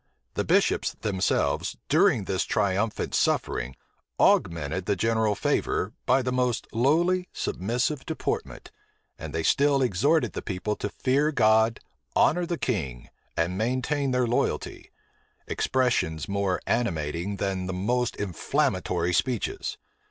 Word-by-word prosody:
The - - -1
bishops - - +2
themselves, 95 -2 0
during 105 - +4
this 95 0 -1
triumphant 100 +1 0
suffering, 65 +2 0 0.4
augmented 85 +2 +2
the 100 - +2
general 110 +1 +1
favor, - - 0
by 130 +1 +4
the 125 - -1
most 125 -1 0
lowly, 170 +9 +2
submissive 125 +8 -1
deportment; 160 - -4 0.5
and - - -6
they 80 - -2
still 140 - +3
exhorted 135 - +2
the - - -4
people 105 +2 -3
to 105 - -3
fear 140 +7 +1
God, 110 -3 +3 0.4
honor 175 +1 +3
the 170 - -2
king, 70 - -3 0.3
and 90 +3 0
maintain 130 +5 0
their 125 -1 +2
loyalty; 120 +1 -2 0.6
expressions 120 - 0
more 100 -2 0
animating 85 -4 -1
than 95 -2 -2
the - - -2
most 120 +7 0
inflammatory 90 -2 -1
speeches. 135 - -1
110 Hz, 120 wpm, -26 LUFS, 95-130 Hz, 0.6 s, during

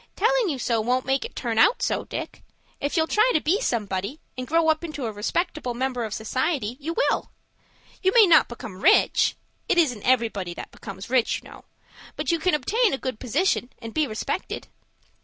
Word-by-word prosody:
"Telling 475 0 +2
you 285 - -2
so 235 -3 0
won't 250 +3 0
make 270 0 0
it - - -9
turn 230 -3 -1
out 440 - +4
so, - - 0
Dick. - - -6 0.4
If 285 +4 -2
you'll 320 - +4
try 430 +8 +3
to - - +5
be 365 +9 +1
somebody, 210 - -2 0.2
and 255 0 -5
grow 330 0 +2
up 315 +1 +1
into 300 -6 -5
a 225 - -2
respectable 250 - -2
member 255 -1 -1
of 215 - -6
society, 255 +1 -1
you 325 +3 -4
will. - - +1 0.7
You 380 - +3
may 450 0 +7
not 330 -4 +6
become 230 -5 -8
rich,—it 360 0 +2
isn't 255 -11 +2
everybody 220 -8 0
that - - -8
becomes 195 +2 -9
rich, 255 -3 +2
you - - -13
know—but - - -8
you 335 - +1
can 340 0 +2
obtain 405 - +1
a - - -6
good 260 -4 -5
position, 260 - 0
and 230 -2 -9
be 310 -2 +1
respected." 215 -2 -4
265 Hz, 190 wpm, -24 LUFS, 230-335 Hz, 0.7 s, may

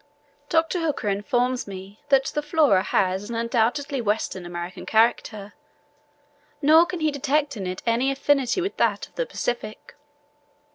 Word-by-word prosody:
Dr. 325 +2 +1
Hooker 305 -10 -1
informs 245 +5 0
me 195 +1 -9
that 270 -1 +4
the 295 - 0
Flora 295 - +3
has 190 +1 0
an 235 - -4
undoubtedly 240 +4 0
Western 205 -4 -2
American 175 +1 -6
character; 220 -2 +1 1.1
nor 315 +3 +6
can 360 -2 -5
he 310 -1 +2
detect 285 0 0
in 195 -4 -4
it 185 0 -5
any 235 +3 +2
affinity 275 +3 +1
with 385 +3 -3
that - - +1
of - - -34
the - - -2
Pacific. 235 - -4
245 Hz, 145 wpm, -24 LUFS, 205-290 Hz, 1.1 s, nor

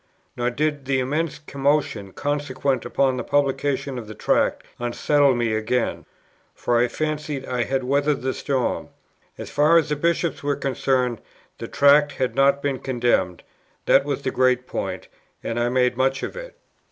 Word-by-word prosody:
Nor 120 0 0
did 145 +2 -2
the 135 0 +1
immense 150 +4 -1
commotion 140 -8 -1
consequent 140 0 -2
upon 130 -2 +1
the 120 - -3
publication 140 -1 0
of 110 - -9
the 110 - -9
Tract - - +1 0.2
unsettle 135 +3 +2
me 120 -2 0
again; 115 +3 -1 0.5
for 120 -1 +1
I 120 - +3
fancied 150 -1 -3
I 125 -1 -1
had 135 -1 -1
weathered 140 +1 +1
the 130 0 0
storm, 135 -3 -2 0.5
as - - -8
far 150 +3 +4
as 160 -2 +2
the 150 - +1
Bishops 170 +2 0
were 145 0 0
concerned: 130 -3 0 0.4
the - - -5
Tract 145 +1 +4
had 130 -2 -1
not 140 +1 +3
been 140 -3 -1
condemned: 120 -9 0 0.4
that - - +5
was 140 -1 -3
the 130 - -1
great 125 0 +2
point, - - -4 0.4
and 115 - -2
I 120 0 +1
made 125 -1 +2
much 135 +2 0
of - - -4
it. - - -9
135 Hz, 165 wpm, -23 LUFS, 125-145 Hz, 0.5 s, that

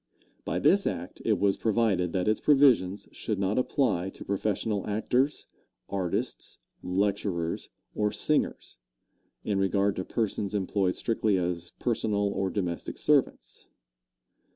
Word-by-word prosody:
By - - -1
this - - +4
act - - -4
it - - +2
was 100 -1 +2
provided 110 -6 +1
that 90 +1 -1
its 110 - +2
provisions 130 -10 +4
should 110 - -3
not 100 +4 +1
apply 125 -9 +1
to - - -10
professional 100 +1 -1
actors, 125 +7 0 0.4
artists, 95 -3 -2 0.2
lecturers 95 -3 -1 0.2
or 105 -1 0
singers, 150 - -1 0.6
in 100 -2 0
regard 100 +1 +2
to 95 - -1
persons 105 -1 -2
employed 95 -1 0
strictly 110 -3 +1
as 85 -1 -3
personal 105 -4 0
or 95 -1 -1
domestic 90 -3 -3
servants. - - 0
100 Hz, 125 wpm, -28 LUFS, 95-110 Hz, 0.6 s, this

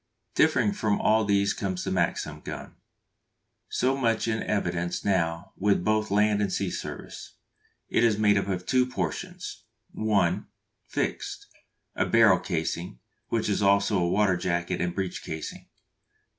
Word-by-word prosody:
_ - - -48
Differing 205 - +3
from 110 - 0
all 110 0 +3
these 100 -1 +2
comes 95 -3 -3
the - - -3
Maxim 85 -4 -1
gun, - - -7 1.0
so 130 +2 +1
much 115 -4 +1
in 110 -1 0
evidence 90 -4 -1
now 85 -2 0
with 100 -2 +2
both 110 +1 +1
land 105 +1 +3
and 100 -2 0
sea 95 -2 -1
service. - - -7 0.5
It - - +2
is 110 -3 +4
made 105 -1 +4
up 100 -1 0
of 90 -2 -2
two 125 -1 +3
portions: 180 +7 -4 0.3
(1) 100 -6 +1 0.4
Fixed: - - -3 0.5
a - - +1
barrel 110 -5 +6
casing, 85 -5 -3 0.3
which 115 -2 0
is 105 0 0
also 100 0 +3
a 85 -1 +1
water 100 -1 +3
jacket, 85 -1 -1
and 90 0 -1
breech 95 -2 -3
casing. 80 -1 -6
100 Hz, 150 wpm, -27 LUFS, 90-110 Hz, 1.0 s, barrel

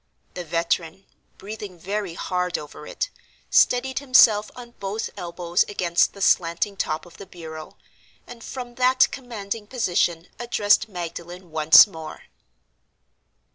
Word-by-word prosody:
The 180 - -5
veteran 170 +2 -2 0.3
(breathing 205 -2 -8
very 195 0 -4
hard 180 -1 -2
over 150 -1 -10
it) - - -4 0.4
steadied 260 +2 +3
himself 225 -6 +5
on 240 -1 -11
both 200 +2 -4
elbows 175 0 -1
against 175 -4 +1
the 200 - -5
slanting 170 +4 +2
top 155 -4 -3
of 175 - -16
the 200 - -11
bureau, 160 -3 -10 0.5
and 235 -1 -12
from 245 -2 -7
that 255 +1 +5
commanding 220 -5 -6
position 175 -7 0
addressed 215 -2 +2
Magdalen 175 -1 -8
once 155 0 +8
more. 160 -6 -10
190 Hz, 125 wpm, -23 LUFS, 170-220 Hz, 0.5 s, once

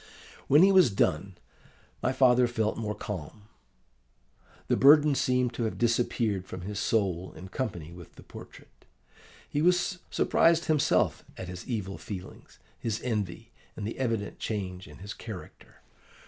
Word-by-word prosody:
"When 150 +5 +6
he 195 - +6
was 185 -8 +6
gone, 95 -1 0 0.7
my - - +1
father 125 -2 +4
felt 110 -2 -1
more 105 -2 -3
calm. 100 0 -7 1.2
The - - +2
burden 145 +2 +6
seemed 125 -2 +1
to 115 0 -2
have 110 - -3
disappeared 115 -4 0
from 90 - -7
his 100 +3 -5
soul 95 -6 0
in 90 +4 -10
company 90 - -4
with 90 -2 -13
the - - -14
portrait. - - -14 0.6
He 145 - -1
was 180 +2 +2
surprised 170 +1 +3
himself 155 -3 +2
at 90 - -6
his 90 0 -8
evil 105 -6 -4
feelings, 95 -3 -9 0.2
his 110 -2 -2
envy, 110 -1 -3 0.2
and 105 - -5
the 110 - -5
evident 115 -5 -2
change 95 -4 -4
in - - -13
his 100 +3 -7
character. 110 -6 -11
110 Hz, 145 wpm, -28 LUFS, 95-125 Hz, 1.2 s, When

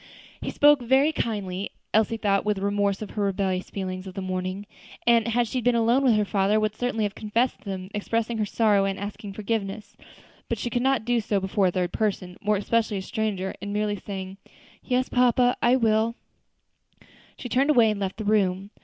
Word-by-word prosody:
He - - -3
spoke 290 -2 +5
very 265 +5 +3
kindly; 200 -8 -3 0.2
Elsie 220 +1 +2
thought 200 -2 +1
with 210 -1 0
remorse 200 +1 0
of 210 - -8
the 210 - -2
rebellious 190 -2 -1
feelings 185 -1 -5
of 185 - -9
the - - -4
morning, 185 +1 -3 0.4
and, 235 -1 +4
had 235 +1 +1
she 255 +3 -2
been 245 0 +2
alone 235 +4 +3
with 245 -5 +4
her 210 -1 +2
father, 200 +1 +2
would 215 0 -1
certainly 245 -2 -1
have 205 -1 -1
confessed 225 +5 -1
them, 190 -1 -5
expressing 225 +2 -1
her 215 - +1
sorrow 210 -2 +3
and 195 -1 -2
asking 205 0 -6
forgiveness; 210 0 -4 0.5
but 235 - -1
she 235 +3 -4
could 245 - 0
not 265 -3 +1
do 245 0 +2
so 205 -2 0
before 190 0 +1
a - - +1
third 180 -1 -2
person, 190 -4 -2
more 210 0 +2
especially 215 +1 0
a - - -3
stranger; 205 -3 -2
and 205 0 -4
merely 210 0 0
saying, 190 -1 -7 0.5
"Yes, 255 0 0
papa, 250 0 +3
I 240 +2 +4
will," 225 -1 +2 1.2
she - - -6
turned 265 +4 +1
away 235 -7 +5
and 210 - -4
left 195 -1 -3
the 215 - -5
room. 200 -2 +1
210 Hz, 200 wpm, -25 LUFS, 195-230 Hz, 1.2 s, spoke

